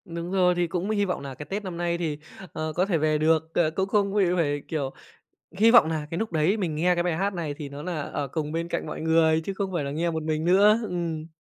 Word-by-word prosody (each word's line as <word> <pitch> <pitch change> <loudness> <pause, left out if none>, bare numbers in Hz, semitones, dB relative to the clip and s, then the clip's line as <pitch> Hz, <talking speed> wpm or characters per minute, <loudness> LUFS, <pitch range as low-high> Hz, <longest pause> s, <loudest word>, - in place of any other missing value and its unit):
Đúng 170 -1 -6
rồi. 180 -2 +3
Thì 175 0 +1
cũng 180 +3 -3
hy 205 -2 +1
vọng 180 -5 -2
nà 140 -1 -6
cái 150 - -8
Tết 205 +5 -4
năm 180 -3 -6
nay 170 0 -1
thì, 160 -4 -2 0.4
ờ, 155 0 -3
có 180 - +2
thể 190 -4 +1
về 155 0 +1
được. 160 +1 +1
Ờ, 160 -2 +2
cũng 190 +4 -1
không 200 -1 +1
bị 205 -1 +3
phải, 145 -4 0
kiểu, 140 -4 -3 0.7
hy 225 +3 +6
vọng 235 -9 +7
nà 155 -2 -2
cái 165 - -3
lúc 220 -2 -3
đấy 160 +6 +2
mình 180 -7 -2
nghe 175 +4 +2
cái 175 - 0
bài 175 -2 -1
hát 195 +3 -1
này 160 -5 -3
thì 145 -1 -7
nó 140 +1 -8
nà 170 -2 -3
ở 140 0 -4
cùng 150 +2 -3
bên 165 +1 -2
cạnh - - -3
mọi - - -6
người, 160 0 +3
chứ 195 - -4
không 195 -1 -3
phải 170 -5 -1
là 140 - -3
nghe 165 +4 -1
một 160 -1 -3
mình 155 0 -1
nữa. 200 +5 +5
Ừm. 165 -3 -3
170 Hz, 280 wpm, -26 LUFS, 155-185 Hz, 0.7 s, vọng